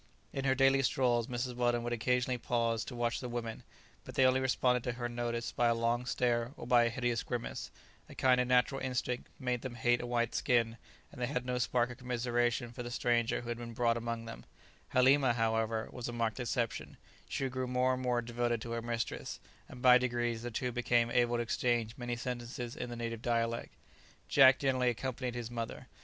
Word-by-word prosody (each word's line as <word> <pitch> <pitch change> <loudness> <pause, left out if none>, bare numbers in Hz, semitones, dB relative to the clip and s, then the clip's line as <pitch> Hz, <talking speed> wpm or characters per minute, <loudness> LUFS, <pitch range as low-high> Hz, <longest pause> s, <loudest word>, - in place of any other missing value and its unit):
In 135 0 -3
her 130 -1 +3
daily 135 +1 +4
strolls, 120 -3 +2
Mrs. 125 0 -3
Weldon 120 -1 +1
would 120 0 -2
occasionally 125 +2 0
pause 115 -1 0
to 125 - -7
watch 120 0 0
the 125 - -5
women, 115 -2 -4 0.4
but - - -10
they 130 - +5
only 130 0 +4
responded 125 -2 +2
to 125 - -1
her 120 0 -3
notice 120 -1 -3
by 120 - +2
a 115 - +3
long 120 +2 0
stare 120 0 0
or - - -7
by 120 -1 +5
a - - +2
hideous 120 0 -1
grimace; 120 -1 -4 0.4
a - - -11
kind 125 -1 +4
of 125 - -1
natural 125 +2 +3
instinct 125 -1 -2
made 125 -3 -1
them 130 -2 -6
hate 120 +1 +2
a 120 - -5
white 120 -1 0
skin, 115 -2 +1 0.3
and 125 - -10
they 120 - +1
had 125 -2 -2
no 125 0 -1
spark 120 0 +1
of 120 - -10
commiseration 120 -1 0
for 125 +1 -7
the 120 - -5
stranger 120 -1 +1
who 120 - -8
had 120 0 -3
been 120 -1 -7
brought 115 -1 +2
among 115 0 -3
them; 115 - -8 0.5
Halima, 130 0 +4
however, 115 -1 0
was 125 -1 -5
a - - -5
marked 115 0 -1
exception, 120 -1 -2 0.3
she 135 - -1
grew 130 0 -3
more 125 +1 +2
and 130 - -3
more 125 -2 +1
devoted 120 0 -1
to 115 - -6
her 115 0 -2
mistress, 115 0 -3 0.3
and 125 - -10
by 125 0 +8
degrees, 120 -2 -1
the 120 - -4
two 125 +2 -2
became 120 -1 +2
able 120 0 +2
to 120 - 0
exchange 115 -1 0
many 120 -1 -3
sentences 120 0 -5
in 125 - -5
the 120 - -5
native 115 -1 -4
dialect. 115 -1 -1 0.5
Jack 135 -2 +7
generally 130 -2 +2
accompanied 125 +1 -3
his 120 -1 -5
mother. 115 -1 -5
120 Hz, 210 wpm, -33 LUFS, 115-125 Hz, 0.5 s, by